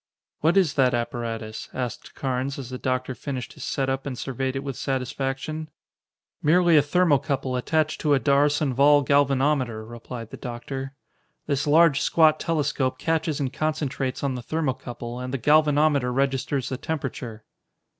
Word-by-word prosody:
"What 165 Hz, +5 st, +3 dB
is 175 Hz, -7 st, +3 dB
that 130 Hz, -3 st, +3 dB
apparatus?" 115 Hz, -2 st, -4 dB
asked 125 Hz, -4 st, -5 dB
Carnes 130 Hz, +1 st, -2 dB
as 130 Hz, -3 st, -7 dB
the 125 Hz, -, -5 dB
doctor 130 Hz, 0 st, -1 dB
finished 130 Hz, -3 st, -5 dB
his -, -, -10 dB
set 135 Hz, -1 st, -1 dB
up 135 Hz, +1 st, -2 dB
and 130 Hz, -3 st, -4 dB
surveyed 130 Hz, +1 st, -3 dB
it 135 Hz, -, -3 dB
with 135 Hz, -2 st, -4 dB
satisfaction. 135 Hz, +4 st, -3 dB, 0.7 s
"Merely 170 Hz, +2 st, +4 dB
a 150 Hz, -, +7 dB
thermocouple 145 Hz, -4 st, +1 dB
attached 155 Hz, +5 st, 0 dB
to 150 Hz, -2 st, +3 dB
a -, -, +2 dB
D'Arsonval 145 Hz, 0 st, +4 dB
galvanometer," 135 Hz, -5 st, +2 dB
replied 115 Hz, 0 st, -8 dB
the -, -, -7 dB
doctor. 135 Hz, +2 st, -6 dB, 0.5 s
"This 145 Hz, 0 st, -1 dB
large, 155 Hz, -1 st, +5 dB
squat 155 Hz, -2 st, +4 dB
telescope 145 Hz, -5 st, 0 dB
catches 160 Hz, -1 st, -1 dB
and 135 Hz, -2 st, -2 dB
concentrates 145 Hz, -4 st, -2 dB
on 140 Hz, -2 st, 0 dB
the 125 Hz, -, -5 dB
thermocouple 125 Hz, -4 st, -4 dB
and 125 Hz, 0 st, -5 dB
the 135 Hz, -, -1 dB
galvanometer 150 Hz, -1 st, +3 dB
registers 135 Hz, 0 st, 0 dB
the 130 Hz, -, -3 dB
temperature." 125 Hz, -7 st, -5 dB
135 Hz, 150 wpm, -25 LUFS, 125-150 Hz, 0.7 s, a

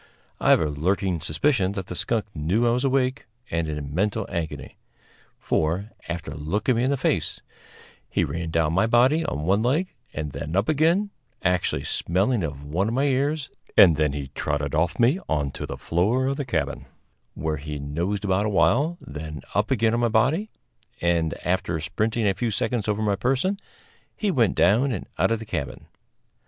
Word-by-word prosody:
I -, -, +2 dB
have -, -, +7 dB
a -, -, +2 dB
lurking 90 Hz, +4 st, 0 dB
suspicion 100 Hz, -, +1 dB
that 95 Hz, -3 st, -4 dB
that 90 Hz, -, -6 dB
skunk 115 Hz, +3 st, 0 dB
knew 90 Hz, +10 st, +1 dB
I 120 Hz, -, +4 dB
was 125 Hz, +2 st, 0 dB
awake 135 Hz, 0 st, +1 dB, 0.2 s
and 80 Hz, -1 st, 0 dB
in 75 Hz, -2 st, -4 dB
mental 100 Hz, +5 st, 0 dB
agony; 85 Hz, -3 st, -5 dB, 0.6 s
for, 90 Hz, +8 st, -1 dB, 0.2 s
after 85 Hz, -4 st, -4 dB
looking 95 Hz, -, 0 dB
me 120 Hz, -, +2 dB
in 130 Hz, -, +2 dB
the 140 Hz, -, +1 dB
face, -, -, 0 dB, 0.7 s
he -, -, +1 dB
ran 85 Hz, 0 st, -3 dB
down 80 Hz, -1 st, +1 dB
my 95 Hz, +5 st, +3 dB
body 130 Hz, +8 st, +4 dB
on 75 Hz, -, -3 dB
one 95 Hz, +6 st, +2 dB
leg 150 Hz, +11 st, +1 dB, 0.2 s
and 75 Hz, -1 st, -4 dB
then 75 Hz, +4 st, -5 dB
up 100 Hz, +3 st, +2 dB
again, 165 Hz, +7 st, +2 dB, 0.3 s
actually 90 Hz, -6 st, +1 dB
smelling 100 Hz, +6 st, 0 dB
of 70 Hz, -3 st, -4 dB
one 85 Hz, +8 st, 0 dB
of 115 Hz, -, -1 dB
my 135 Hz, -, +2 dB
ears; 140 Hz, +2 st, 0 dB, 0.3 s
and 85 Hz, -5 st, +8 dB
then 75 Hz, -2 st, +1 dB
he 70 Hz, -2 st, -5 dB
trotted 75 Hz, 0 st, -2 dB
off 85 Hz, +3 st, +1 dB
me 125 Hz, +10 st, +4 dB
on 75 Hz, -3 st, 0 dB
to -, -, -6 dB
the -, -, -5 dB
floor 105 Hz, +10 st, +1 dB
of 135 Hz, +1 st, 0 dB
the 145 Hz, -, -2 dB
cabin, 80 Hz, -, -2 dB, 0.5 s
where 80 Hz, -1 st, -2 dB
he 75 Hz, +1 st, -5 dB
nosed 85 Hz, +9 st, -2 dB
about 100 Hz, +2 st, +2 dB
awhile, 140 Hz, -, +2 dB
then 75 Hz, 0 st, -7 dB
up 105 Hz, +2 st, +1 dB
again 115 Hz, -3 st, +2 dB
on 120 Hz, -, +1 dB
my 120 Hz, -1 st, +2 dB
body; 135 Hz, -, +2 dB, 0.5 s
and, 85 Hz, -2 st, +1 dB
after 90 Hz, -2 st, 0 dB
sprinting 110 Hz, +8 st, 0 dB
a 100 Hz, -, +3 dB
few 120 Hz, +4 st, -1 dB
seconds 115 Hz, 0 st, -1 dB
over 105 Hz, 0 st, 0 dB
my 100 Hz, -2 st, +2 dB
person, 135 Hz, -, +1 dB, 0.6 s
he 210 Hz, -2 st, +1 dB
went 120 Hz, -, +2 dB
down 115 Hz, +10 st, +4 dB
and 100 Hz, -, -3 dB
out 95 Hz, +5 st, +3 dB
of 115 Hz, -, +2 dB
the 115 Hz, -, -8 dB
cabin. 70 Hz, -9 st, -4 dB
100 Hz, 190 wpm, -25 LUFS, 80-120 Hz, 0.7 s, and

